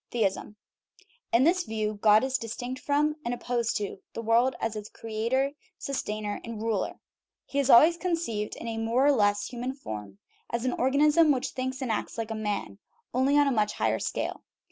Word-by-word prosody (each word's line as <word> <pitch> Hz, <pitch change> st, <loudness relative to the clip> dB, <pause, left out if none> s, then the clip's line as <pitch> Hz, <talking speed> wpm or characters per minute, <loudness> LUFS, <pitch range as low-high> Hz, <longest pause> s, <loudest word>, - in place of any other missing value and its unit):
THEISM 210 Hz, -2 st, -1 dB, 0.8 s
In 235 Hz, +3 st, +4 dB
this 355 Hz, +5 st, +4 dB
view 215 Hz, -3 st, -2 dB
God 215 Hz, +1 st, +6 dB
is 265 Hz, 0 st, 0 dB
distinct 245 Hz, +3 st, -5 dB
from, 300 Hz, +1 st, +1 dB
and 240 Hz, +1 st, -1 dB
opposed 240 Hz, -2 st, -1 dB
to, 205 Hz, -2 st, -4 dB, 0.2 s
the 230 Hz, -, -4 dB
world 235 Hz, +3 st, +3 dB
as 225 Hz, -1 st, -2 dB
its 210 Hz, 0 st, -6 dB
creator, 230 Hz, +5 st, -1 dB, 0.3 s
sustainer, 215 Hz, -6 st, -3 dB
and 230 Hz, -2 st, -6 dB
ruler. 220 Hz, -3 st, -2 dB, 0.5 s
He 280 Hz, -, -2 dB
is 280 Hz, -1 st, +1 dB
al 235 Hz, -, +10 dB
ways 335 Hz, +2 st, +3 dB
conceived 330 Hz, -, -2 dB
in -, -, -7 dB
a 225 Hz, -1 st, -3 dB
more 230 Hz, +4 st, +2 dB
or 290 Hz, -, +6 dB
less 205 Hz, -5 st, +2 dB
human 250 Hz, +2 st, -4 dB
form, 105 Hz, -, -7 dB, 0.3 s
as 235 Hz, +1 st, -2 dB
an 255 Hz, -, +1 dB
organism 300 Hz, +4 st, +4 dB
which 260 Hz, -2 st, 0 dB
thinks 260 Hz, +1 st, -4 dB
and 245 Hz, -, -1 dB
acts 220 Hz, -, -3 dB
like 225 Hz, -1 st, -3 dB
a -, -, 0 dB
man 210 Hz, -2 st, -3 dB, 0.3 s
only 265 Hz, +3 st, +3 dB
on 290 Hz, -, +5 dB
a 275 Hz, -, +2 dB
much 210 Hz, -3 st, +1 dB
higher -, -, 0 dB
scale. -, -, -3 dB
235 Hz, 190 wpm, -28 LUFS, 215-270 Hz, 0.8 s, al